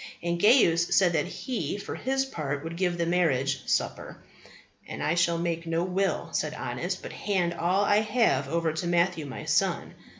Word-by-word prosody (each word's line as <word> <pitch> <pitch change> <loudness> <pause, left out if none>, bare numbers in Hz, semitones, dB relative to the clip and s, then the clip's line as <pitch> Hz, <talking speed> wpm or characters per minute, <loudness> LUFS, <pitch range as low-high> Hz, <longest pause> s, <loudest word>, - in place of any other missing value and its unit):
And 170 0 -1
Gaius 170 -8 +4
said 180 -3 +4
that 150 -2 +1
he 205 - -4
for 205 - -6
his 270 +1 -1
part 145 - -4
would 165 +1 -6
give 175 -1 0
the 170 - 0
marriage 140 -6 +1
supper. - - -1 0.7
And - - -5
I 155 - +1
shall 170 0 +2
make 170 0 -2
no 165 +1 0
will, 190 +2 -1
said - - -2
Honest, - - -4
but - - -7
hand 180 -4 -1
all 180 +4 +1
I 205 - +4
have 215 - +2
over 165 0 0
to 160 +2 -3
Matthew 170 -2 +1
my 130 - -7
son. - - 0
170 Hz, 180 wpm, -27 LUFS, 165-195 Hz, 0.7 s, Gaius